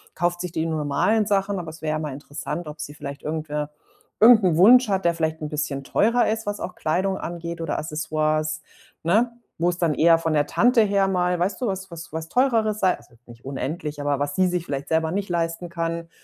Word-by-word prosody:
kauft 175 0 0
sich 180 -1 -4
die 160 0 -1
normalen 160 +8 +1
Sachen, 200 -1 +1
aber 165 - -6
es 160 +1 -12
wäre 155 - 0
ja 155 - -1
mal 155 -2 -4
interessant, 150 +4 -6
ob 150 0 -8
sie 145 - -7
vielleicht 140 -1 -7
irgendwe 150 -1 -3 0.5
irgend 225 -1 +8
'n 175 -4 +3
Wunsch 245 +7 +7
hat, 195 -2 0
der 170 - +4
vielleicht 160 -1 -2
'n 150 - -5
bisschen 150 -2 -3
teurer 230 - +2
ist, 225 -1 -3
was 205 0 -2
auch 180 - -5
Kleidung 190 +5 -1
angeht 170 0 -5
oder 165 -2 -2
Accessoires, 155 0 -1 0.4
ne? 220 +8 +3 0.3
Wo 170 +2 +2
es 175 - -2
dann 170 -3 +1
eher 165 +2 +5
von 165 -1 -1
der 145 -1 +2
Tante 240 - +4
her 200 -2 +2
mal, 180 -2 +1
weißt 185 +4 -1
du, 250 - 0
was 190 -1 -4
was 165 -2 -9
was 160 +1 -5
Teureres 225 -2 +2
sei 185 -1 +3
also 120 - -21
nicht 120 0 -15
unendlich, 145 +2 -4
aber 145 -1 0
was 145 0 -2
sie 185 -1 +3
sich 175 -1 -2
vielleicht 140 -1 -4
selber 160 0 +1
nicht 195 +2 -2
leisten 170 0 -2
kann, 165 0 -3
165 Hz, 220 wpm, -24 LUFS, 155-190 Hz, 0.5 s, irgend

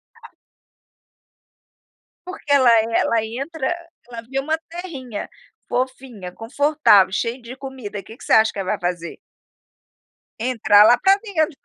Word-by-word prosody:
A - - -16 2.0
Porque 365 -5 -6
ela 265 -4 +5 0.2
ela 225 -1 +2
entra 275 +7 -3 0.4
ela 235 -1 -7
vê 270 - -4
uma 315 +3 -1
terrinha, 290 - -7 0.4
fofinha, 250 -6 -4
confortável, 265 -4 +3
cheia 235 +4 -2
de 240 +2 -9
comida, 260 -7 -8
que 225 - -13
que - - -14
você - - 0
acha 220 0 +5
que - - -7
ela 190 -1 -2
vai - - -13
fazer? 170 -1 -9 1.2
Entrar 220 -4 +4
lá 240 +2 +6
pra 390 +6 +4
dentro. 335 -8 -2
255 Hz, 135 wpm, -21 LUFS, 220-285 Hz, 2.0 s, lá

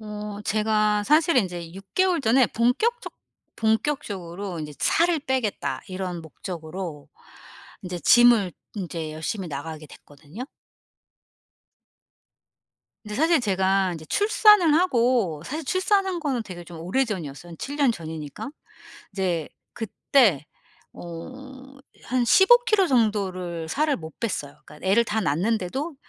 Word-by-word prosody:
어 210 -1 -7
제가 215 -1 +1
사실은 305 -1 +4
인제 175 -3 -6
6 195 0 -12
개월 370 -3 +3
전에 255 0 +4
본격적 440 - 0 0.4
본격적으로 205 - -2
인제 150 -1 -6
'살을 340 -1 +2
빼겠다.' 260 -6 -2
이런 185 -2 -4
목적으로 160 -1 -7 0.7
인제 180 -1 -5
gym을 235 -6 +5 0.2
인제 165 -5 -4
열심히 170 +4 -4
나가게 155 +1 -6
됐거든요. 150 - -11 2.6
근데 210 0 -6
사실 320 +4 +4
제가 190 -3 +1
인제 160 -2 -8
출산을 415 - +5
하고 240 - +2
사실 305 - -4
출산한 375 +2 +1
거는 270 -6 -1
되게 180 -5 -9
좀 170 -1 -10
오래 190 +11 +1
전이었어요. 175 - -6
한 165 - -10
7 285 +1 -5
년 280 -5 +3
전이니까. 160 - -7 0.6
이제 180 -5 -2 0.2
그때 220 - +2 0.5
어 265 +11 -10 0.3
한 250 0 +1
15 385 - +7
킬로 430 -5 +3
정도를 190 - 0
살을 295 - 0
못 160 -2 -10
뺐어요. 150 -11 -3
그러니까 150 +5 -9
애를 215 +5 +4
다 220 -1 -1
낳았는데도 215 - -1
210 Hz, 265 characters per minute, -24 LUFS, 175-270 Hz, 2.6 s, 15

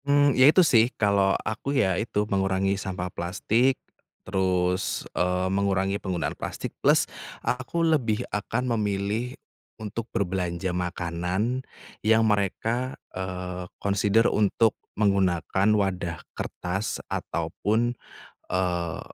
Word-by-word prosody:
Mmm, 145 0 +4
ya 130 +3 +7
itu 180 +3 +6
sih 120 -5 +5
kalau 100 -2 +3
aku 135 +6 -2
ya 95 -8 +3
itu 105 -2 -1
mengurangi 95 -1 +1
sampah 95 -2 -4
plastik, 115 +9 +1 0.5
terus, 95 -1 0
eee, 90 +1 +1
mengurangi 100 0 +1
penggunaan 90 -4 -2
plastik - - -5
plus - - +4 0.4
aku 130 +7 0
lebih 125 -8 +1
akan 120 +4 -1
memilih 105 +4 -1 0.4
untuk 110 +1 -4
berbelanja 90 -3 -1
makanan 90 +6 -1 0.4
yang 110 +1 +4
mereka, 110 +5 0 0.2
eee, 90 -1 -5
consider 100 +3 +2
untuk 105 +1 +3 0.2
menggunakan 95 -1 +2
wadah 90 -5 -1 0.2
kertas 95 +4 -3
ataupun, 115 +4 -1 0.6
eee, 90 -3 -1
100 Hz, 105 wpm, -26 LUFS, 90-115 Hz, 0.6 s, ya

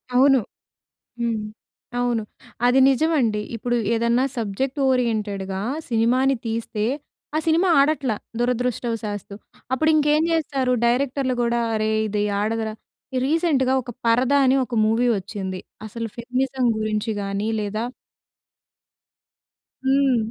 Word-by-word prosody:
అవును. 270 +1 +6 0.8
హ్మ్. 235 -2 0 0.6
అవును. 240 -2 0 0.4
అది 250 +2 +5
నిజమండి. 265 -7 +2
ఇప్పుడు 240 +2 -1 0.2
ఏదన్నా 235 +2 +2
సబ్జెక్ట్ 245 +6 -2
ఓరియెంటెడ్‌గా 210 -6 -1 0.3
సినిమాని 250 +4 +3
తీస్తే, 225 -1 -2 0.5
ఆ - - +3
సినిమా 335 +4 +3
ఆడట్ల 280 -3 +2 0.3
దురదృష్టవశాస్తు. 230 -4 -2 0.4
అప్పుడు 310 +5 +2
ఇంకేం 300 +1 +3
చేస్తారు 275 -6 +1
డైరెక్టర్‌లు 255 +1 +1
కూడా, 235 0 +1 0.2
అరే! 215 0 0 0.2
ఇది 210 0 -1 0.2
ఆడదురా 220 0 -1 0.5
రీసెంట్‌గా 290 -4 +2
ఒక 240 - -8
'పరద' 250 +4 +3
అని 260 +1 +4
ఒక 240 - -5
మూవీ 225 +3 +2
వచ్చింది. 190 -1 -5 0.3
అసలు 230 +1 -5
ఫెమినిజం 255 +2 -1
గురించి 215 +1 -1
గాని 200 +2 -2
లేదా 215 +2 -2 2.0
హ్మ్. 270 -2 +3
240 Hz, 105 wpm, -23 LUFS, 220-265 Hz, 2.0 s, అవును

